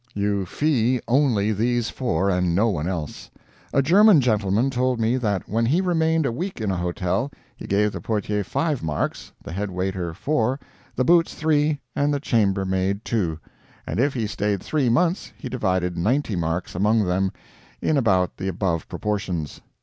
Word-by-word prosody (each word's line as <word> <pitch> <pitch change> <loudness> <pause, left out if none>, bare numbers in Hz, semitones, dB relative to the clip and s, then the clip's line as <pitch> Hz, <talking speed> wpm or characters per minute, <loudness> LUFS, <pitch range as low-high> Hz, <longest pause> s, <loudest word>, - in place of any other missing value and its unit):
You 100 -2 0
fee 130 - +1
only 120 -6 +2
these 120 +2 0
four, 120 -6 -1
and 90 -2 +1
no 110 +5 +3
one 85 -5 -2
else. 85 -6 -5 0.4
A 140 - +3
German 195 +4 +6
gentleman 110 0 +1
told 125 -1 0
me 115 +2 +2
that 105 -7 -1
when 115 +2 0
he 155 +9 +3
remained 160 -4 +1
a 135 - +1
week 180 +9 -4
in 105 -3 -1
a - - -1
hotel, 90 +7 -1 0.3
he - - -9
gave 105 +1 +2
the 90 - -6
portier 105 0 -1
five 150 - -1
marks, 75 -2 -3
the - - -8
head 100 +3 -3
waiter 90 -2 -3
four, 130 - 0 0.4
the 130 - +1
Boots 170 +1 +4
three, 150 -2 +1
and 145 +1 +1
the 145 - 0
chambermaid 100 -4 0
two; 90 -9 -1 0.5
and 85 - -3
if 140 +2 +2
he 115 -3 -1
stayed 105 -1 -2
three 145 -5 +1
months 175 - +1
he - - -7
divided 95 -7 -1
ninety 110 +5 0
marks 85 +1 -2
among 105 +4 +2
them, 95 +1 0 0.5
in 155 - +1
about 95 -9 +2
the 95 - -4
above 90 -3 -1
proportions. 95 -7 -3
105 Hz, 175 wpm, -23 LUFS, 95-135 Hz, 0.5 s, German